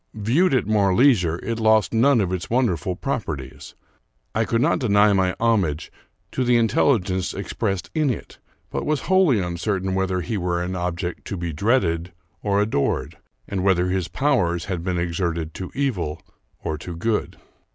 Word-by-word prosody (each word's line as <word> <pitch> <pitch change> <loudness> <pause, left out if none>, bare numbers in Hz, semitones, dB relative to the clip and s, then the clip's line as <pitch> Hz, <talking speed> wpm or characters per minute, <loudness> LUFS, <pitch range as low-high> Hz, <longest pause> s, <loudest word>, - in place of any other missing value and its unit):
Viewed 130 - +2
at 130 - +1
more 100 -3 +2
leisure, 95 - +4
it 115 0 -2
lost 110 -1 +3
none 120 +1 +4
of 95 -2 -1
its 90 -2 -4
wonderful 95 - 0
proper 110 - -3
ties. 65 -1 -11 0.6
I 110 +1 +1
could 115 - 0
not - - +2
deny 105 -4 +4
my 95 -1 +1
homage 95 -10 +1 0.4
to 130 - -1
the 120 -1 +4
intelligence 105 -5 +1
ex - - -5
pressed 95 -2 -2
in 155 -3 +1
it, 120 - -5 0.3
but - - -2
was 150 -1 0
wholly 185 - +3
uncertain 95 +2 -2
whether 95 -1 0
he 105 +6 -3
were 90 -1 -1
an 90 +1 -3
object 90 0 -3
to 100 - -4
be 85 -2 -4
dreaded 90 - +1 0.3
or 100 -1 +1
adored, 105 -9 -1 0.3
and 95 -2 -2
whether 90 -2 +2
his 90 -2 -1
powers 85 - +1
had 90 -4 -3
been 90 -1 -1
exerted 85 -2 -2
to 95 - -6
evil 90 - -1 0.4
or 75 -1 -3
to 85 +1 -7
good. 110 +5 -1
95 Hz, 170 wpm, -23 LUFS, 85-115 Hz, 0.6 s, leisure